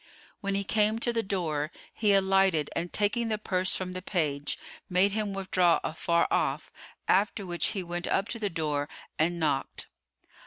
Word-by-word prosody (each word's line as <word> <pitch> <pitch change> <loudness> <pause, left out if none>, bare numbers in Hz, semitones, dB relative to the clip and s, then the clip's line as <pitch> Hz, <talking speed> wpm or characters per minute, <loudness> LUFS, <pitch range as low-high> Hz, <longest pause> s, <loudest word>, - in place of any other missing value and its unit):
When 200 0 -2
he 200 - 0
came 215 +2 +2
to 235 +1 0
the 230 - +1
door, 160 -7 -2 0.2
he 210 -2 +3
alighted 190 -5 +3
and 175 +1 -2
taking 215 +3 +2
the 215 -1 0
purse 185 -3 0
from 185 -1 -3
the 185 - -5
page 150 -7 -1 0.3
made 185 +2 +4
him 210 0 -1
withdraw 185 -3 +2
afar 170 +1 +1
off; - - 0 0.4
after 200 +1 +2
which 175 -1 0
he 190 - -1
went 175 0 -4
up 195 +2 +1
to 230 - -4
the 210 -2 -1
door 150 -3 -2 0.3
and 170 +2 +2
knocked. 145 -4 -1
185 Hz, 170 wpm, -28 LUFS, 170-200 Hz, 0.4 s, made